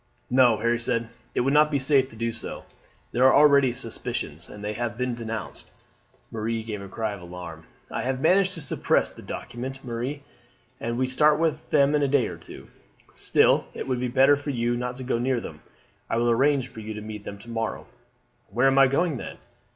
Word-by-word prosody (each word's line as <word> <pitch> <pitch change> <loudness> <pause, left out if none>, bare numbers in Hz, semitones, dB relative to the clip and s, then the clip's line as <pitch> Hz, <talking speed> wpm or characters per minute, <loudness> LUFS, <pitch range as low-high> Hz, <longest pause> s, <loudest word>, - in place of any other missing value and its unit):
"No," 125 -3 +5
Harry 115 +1 +1
said. 115 -1 0 0.3
"It - - +2
would 135 +3 +1
not 150 +1 +5
be 145 - +1
safe 135 -1 +3
to - - -13
do 115 +1 -2
so. - - -7 0.5
There 125 - +1
are 130 - +6
already 140 -3 +6
suspicions, 115 - -3
and 105 0 -10
they 105 +1 -2
have 115 0 -3
been 125 0 -1
denounced." 115 -2 -6 0.6
Marie 115 0 -2
gave 105 -3 -5
a 100 - -8
cry 110 +2 -3
of 100 - -9
alarm. 85 -2 -9 0.3
"I - - -2
have 130 0 -2
managed 185 +5 +3
to 165 - -5
suppress 145 - +1
the - - -13
document, 130 +3 -7
Marie, 125 +4 -4 0.6
and 115 +1 -3
we 130 - +2
start 150 +4 +4
with 160 -1 -1
them 140 -1 +4
in 150 - +2
a 140 - +2
day 135 -2 +3
or 85 - -6
two. 85 - -12 0.4
Still - - +3
it - - -5
will 130 -1 0
be 125 - -1
better 135 +3 +5
for 145 +1 -6
you 120 -2 0
not 125 +1 -3
to 130 - -7
go 125 -2 -1
near 125 0 +1
them. - - -9 0.5
I - - 0
will 120 0 +2
arrange 135 +2 +2
for 120 - -12
you 110 0 -6
to 105 - -6
meet 105 -1 -7
them 100 - -7
to 115 +4 -13
morrow." 115 -1 -3 0.6
"Where 120 +6 +1
am 135 0 +5
I 135 - +7
going, 145 +2 +1
then?" - - -7
125 Hz, 215 wpm, -25 LUFS, 115-135 Hz, 0.6 s, I